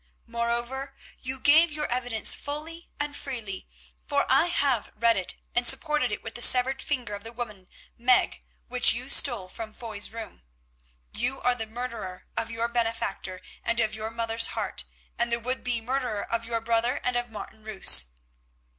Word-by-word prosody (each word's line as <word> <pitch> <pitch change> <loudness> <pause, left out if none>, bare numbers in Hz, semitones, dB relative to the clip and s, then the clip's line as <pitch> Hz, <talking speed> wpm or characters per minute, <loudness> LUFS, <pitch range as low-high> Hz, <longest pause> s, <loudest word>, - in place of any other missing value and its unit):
Moreover, 235 +4 -3 0.2
you 260 +1 -5
gave 310 +5 +6
your 300 0 -2
evidence 245 -3 +3
fully 315 +4 -6
and 290 0 -2
freely, 225 -10 -5 0.4
for 285 -1 +1
I 270 +6 +5
have 280 -9 0
read 230 +1 +3
it, 190 -2 -2 0.2
and 240 0 +3
supported 295 -1 +3
it 210 - -5
with 225 - -7
the 240 - -4
severed 255 +2 +6
finger 250 -7 -3
of 200 0 -6
the 225 - -8
woman 215 -6 -7 0.3
Meg 250 +1 +3 0.3
which 250 -1 +6
you 250 +3 -5
stole 240 -10 +4
from 215 +3 -8
Foy's 215 -3 -3
room. 225 - -9 0.7
You 250 +4 -2
are 250 - +2
the 225 -2 -6
murderer 230 -5 -6
of 225 - -1
your 230 +1 -1
benefactor 225 -5 -2 0.2
and 230 0 0
of 220 -2 +1
your 220 0 -4
mother's 230 0 +1
heart, - - -2 0.3
and 235 0 +1
the 235 - +1
would 255 +3 -3
be 245 -2 -1
murderer 250 -3 -2
of 230 0 0
your 230 0 -2
brother 235 +3 0
and 250 - 0
of 245 0 -2
Martin 220 0 -10
Roos. 200 - +6
235 Hz, 175 wpm, -26 LUFS, 225-255 Hz, 0.7 s, gave